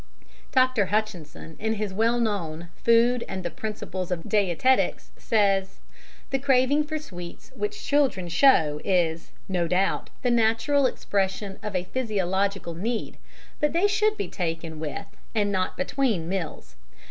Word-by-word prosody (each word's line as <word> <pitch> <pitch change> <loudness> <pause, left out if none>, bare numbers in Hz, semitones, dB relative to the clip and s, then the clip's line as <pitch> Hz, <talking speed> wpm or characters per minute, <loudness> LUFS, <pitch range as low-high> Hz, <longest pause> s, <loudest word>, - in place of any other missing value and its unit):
Dr. 255 -6 +3
Hutchison, 180 -7 -3
in 220 +1 0
his 210 -2 -3
well 230 +4 +2
known 175 -7 -2
Food 235 +1 +3
and 185 -1 -5
the 175 - -2
Principles 190 -4 -5
of 175 -2 -3
Dietetics, 210 +5 +2
says: 195 -3 +1 0.5
"The 270 - +1
craving 275 +2 +3
for 310 +1 -3
sweets 175 - -9
which 210 0 -4
children 270 -11 +2
show 165 - +4
is, 170 -4 0 0.2
no 180 -3 0
doubt, 185 +3 0
the 245 - +2
natural 235 +5 +3
expression 195 -3 -2
of 210 -2 -5
a 180 - +1
physiological 195 -5 -1
need, 220 +7 -3 0.4
but 300 -1 +1
they 345 +4 +3
should 425 +1 +2
be 405 - -2
taken 165 -3 -4
with, 160 +6 -4 0.3
and 205 -2 +2
not 185 -1 -1
between, 220 -6 0
meals. 165 - -5
205 Hz, 140 wpm, -26 LUFS, 180-245 Hz, 0.5 s, show